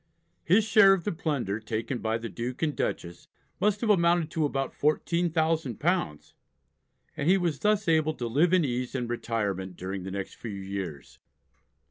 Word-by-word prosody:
His 200 +6 +4
share 205 -2 +6
of 185 -3 -1
the 205 - -1
plunder 140 - -2
taken 115 +3 -3
by 110 0 -1
the 115 0 -6
Duke 120 +6 -5
and 150 -2 0
Dutchess 85 0 -4 0.3
must 210 0 +1
have 225 -3 +3
amounted 170 -4 +3
to 160 -2 0
about 135 -2 -2
£14,000, 160 - 0 0.8
and 145 - -1
he 190 - +6
was 170 -6 -1
thus 210 -1 +1
able 155 -1 +2
to 120 - -4
live 145 +9 +2
in 185 -4 +4
ease 125 0 -3
and 125 -2 -2
retirement 100 -6 -3
during 95 +1 -5
the 95 - -6
next 100 0 -5
few 115 - -7
years. 95 - -6
140 Hz, 165 wpm, -28 LUFS, 110-170 Hz, 0.8 s, share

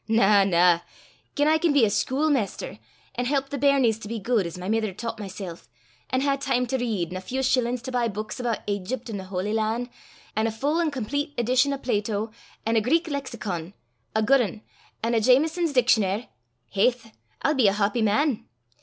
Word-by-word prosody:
Na, 210 -3 +5
na; 175 -2 +4 0.6
gien 290 +1 +2
I 315 +1 +4
can 330 -2 +2
be 275 -5 +5
a - - +2
schuilmaister, 270 - 0 0.3
an' 245 - -2
help 275 +1 0
the 285 - -3
bairnies 265 -5 +3
to 210 - -7
be 230 +2 -3
guid, 215 -3 +1
as 170 - -8
my 180 +1 -6
mither 215 -2 0
taucht 230 +1 -5
mysel', 190 -4 -6 0.5
an' 260 - +1
hae 275 0 +1
time 265 -2 0
to 265 +2 -1
read, 210 -8 -1
an' 185 - -4
a - - -6
feow 260 +8 -3
shillin's 250 -2 +1
to 260 - -5
buy 245 -2 +1
buiks 215 +1 -5
aboot 240 -3 -2
Aigypt 215 +5 -3
an' 205 - -3
the 190 - -7
Holy 190 +2 -3
Lan', 225 +3 -1 0.4
an' 220 +1 +1
a - - -1
full 285 +9 0
an' 330 - +1
complete 285 +3 -3
edition 255 +4 +3
o' 275 - -1
Plato, 215 -3 -1 0.3
an' 225 +1 +2
a - - +4
Greek 325 +10 +2
Lexicon 210 - -4 0.4
a 220 - +2
guid 270 +4 +5
ane, 215 -1 -3 0.4
an' 230 +1 +1
a 225 - +3
Jamieson's 310 +8 +3
Dictionar', 230 -4 +2 0.4
haith, 225 +3 +1 0.3
I'll 300 - +3
be 260 -7 +4
a 195 - +4
hawpy 210 +3 +1
man! 225 +4 +1
230 Hz, 200 wpm, -25 LUFS, 210-270 Hz, 0.6 s, Na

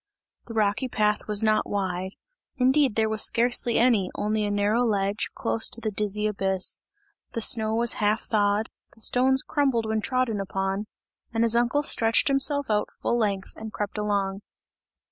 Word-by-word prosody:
The 230 - -8
rocky 215 +3 0
path 210 -3 0
was 210 0 +2
not 215 -1 +1
wide; 190 -1 -3 0.4
indeed 260 -2 +3
there 220 -1 +2
was 220 0 +1
scarcely 240 0 +2
any, 225 -7 +3
only 215 +1 -1
a - - -2
narrow 205 +4 +1
ledge, 200 -2 -1
close 220 - +1
to - - -1
the 220 -1 -3
dizzy 210 +1 -1
abyss. 195 -3 0 0.5
The 230 - -2
snow 220 0 +2
was 235 0 +3
half 210 +1 +1
thawed, 205 0 0 0.2
the 225 - -13
stones 260 +3 +3
crumbled 270 -6 0
when 220 0 -1
trodden 255 -3 -1
upon, 195 +1 -3 0.4
and 225 -1 0
his 230 0 +2
uncle 240 +5 +1
stretched 230 -1 +3
himself 280 +1 +1
out 210 -1 0
full - - +1
length 200 -3 -2
and 220 0 -8
crept 210 0 -4
along. 200 -2 -1
215 Hz, 165 wpm, -25 LUFS, 205-235 Hz, 0.5 s, indeed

